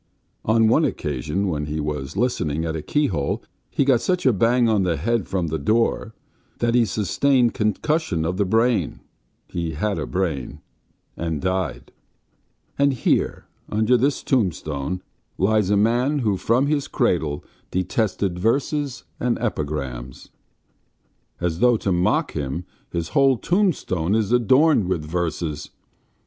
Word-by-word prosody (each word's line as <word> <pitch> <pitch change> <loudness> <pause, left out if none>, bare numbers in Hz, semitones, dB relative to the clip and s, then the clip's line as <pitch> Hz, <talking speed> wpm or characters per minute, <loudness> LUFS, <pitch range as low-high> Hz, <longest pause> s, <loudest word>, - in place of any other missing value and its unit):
On 110 0 +4
one 135 +8 +4
occasion, 75 - -1
when 75 -4 -2
he 75 +1 -3
was 75 +1 -4
listening 80 - 0
at 80 -1 -2
a 80 - -3
keyhole, 130 - -1 0.3
he 140 - +1
got 130 -4 +4
such 180 -1 0
a 130 - +5
bang 120 +4 +3
on 110 -3 +3
the 90 -3 0
head 115 +6 0
from 95 -3 -1
the 80 +1 -2
door 110 +5 0 0.4
that 120 0 +1
he 120 -1 +4
sustained 120 +4 +2
concussion 105 - 0
of 90 +2 -2
the 100 - +3
brain 115 +4 +1 0.5
(he 85 -2 -3
had 100 +7 -1
a - - -3
brain), 80 -9 -2 0.6
and 80 -3 -3
died. 95 +2 -2 0.9
And 140 -1 +4
here, 125 - 0 0.2
under 110 +4 +2
this 135 +4 +1
tombstone, 90 - -1 0.3
lies 105 0 +2
a 105 - +3
man 120 +7 +2
who 110 -7 +1
from 120 +8 +2
his 145 -1 0
cradle 80 - 0 0.3
detested 95 0 -1
verses 135 +5 0 0.2
and 120 -1 0
epigrams.... 70 - -4 1.1
As 85 -1 -1
though 120 0 +4
to 100 - -1
mock 90 0 +1
him 75 +5 -4 0.3
his 85 -1 -3
whole 135 -3 +4
tombstone 125 - +1
is 110 -2 0
adorned 130 - +4
with 85 -5 -1
verses.... 80 -2 -3
100 Hz, 140 wpm, -23 LUFS, 80-120 Hz, 1.1 s, a